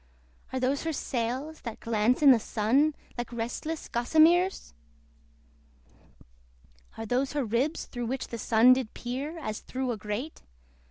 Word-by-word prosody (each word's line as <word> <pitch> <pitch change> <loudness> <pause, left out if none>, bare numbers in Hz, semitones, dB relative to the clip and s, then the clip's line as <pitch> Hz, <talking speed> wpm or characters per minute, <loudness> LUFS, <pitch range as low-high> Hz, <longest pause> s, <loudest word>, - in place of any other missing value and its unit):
Are 260 - -2
those 260 +2 0
her 325 0 -2
sails 260 +5 -3
that 230 -3 -7
glance 230 +4 +1
in 280 - +9
the 245 - +5
Sun, 260 +9 +1 0.2
Like 240 - -4
restless 240 +7 -4
gossameres! 320 - +3 2.2
Are 225 - -5
those 255 +5 0
her 285 -3 0
ribs 245 +9 -1
through 240 -2 -5
which 260 +2 -3
the 235 - -5
Sun 230 +4 +6
Did 255 -4 -3
peer, 270 +7 -4
as 215 -9 -4
through 260 -1 -3
a 230 - -3
grate? 210 +9 -5
255 Hz, 145 wpm, -28 LUFS, 230-290 Hz, 2.2 s, in